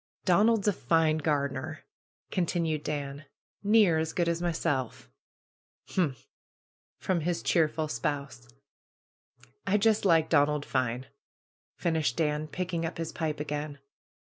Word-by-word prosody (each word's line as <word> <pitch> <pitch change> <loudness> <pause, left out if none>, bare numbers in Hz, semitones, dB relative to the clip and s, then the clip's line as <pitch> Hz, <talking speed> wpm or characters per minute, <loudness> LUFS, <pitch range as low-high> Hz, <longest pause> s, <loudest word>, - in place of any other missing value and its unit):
'^Donald's 210 +3 +4
a 205 - +4
fine 160 -2 +2
gardener 145 0 -2 0.2
!" - - -49
continued 165 -4 0
Ban. 145 0 -4 0.4
^^Near 205 -6 +5
as 160 0 -3
good 175 -2 +1
as 170 0 0
myself." 160 -7 -2 0.8
''Humph!" 150 -9 -1 0.7
from 185 -2 0
his 170 +2 -1
cheerful 155 -1 +2
spouse. 140 - -3 1.2
"I 205 - +4
just 215 +1 +3
like 165 -5 +4
Donald 145 -1 +2
fine 125 -1 -1 0.4
!" - - - 0.3
finished 160 -7 0
Dan, 150 -1 0
picking 175 0 -3
up 165 - -3
his 165 -1 -3
pipe 155 -3 -3
again. 150 -1 -4
160 Hz, 125 wpm, -29 LUFS, 145-175 Hz, 1.2 s, ^^Near